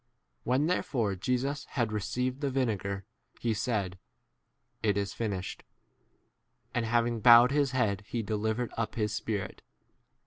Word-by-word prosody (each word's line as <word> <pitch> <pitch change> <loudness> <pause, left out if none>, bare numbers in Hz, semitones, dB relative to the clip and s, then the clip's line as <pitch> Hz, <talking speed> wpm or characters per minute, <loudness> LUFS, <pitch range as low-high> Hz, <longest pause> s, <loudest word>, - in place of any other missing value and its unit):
30 - - -5
When 130 +4 +3
therefore 130 - 0
Jesus 130 +7 -1
had 120 -4 -1
received 125 +6 -2
the 140 - +1
vinegar, 100 -7 -1 0.3
he 115 -1 0
said, 100 -4 -2 0.8
It 105 -2 +2
is 100 -1 -1
finished; 100 -5 -3 1.1
and 115 -2 0
having 120 0 +1
bowed 120 +3 +8
his 145 -1 +2
head 110 -7 0
he 115 -2 -2
de 110 - -3
31 105 - -1
livered 110 +2 -1
up 115 -1 -2
his" 105 -2 0
spirit. 105 -2 -3
115 Hz, 145 wpm, -30 LUFS, 105-125 Hz, 1.1 s, bowed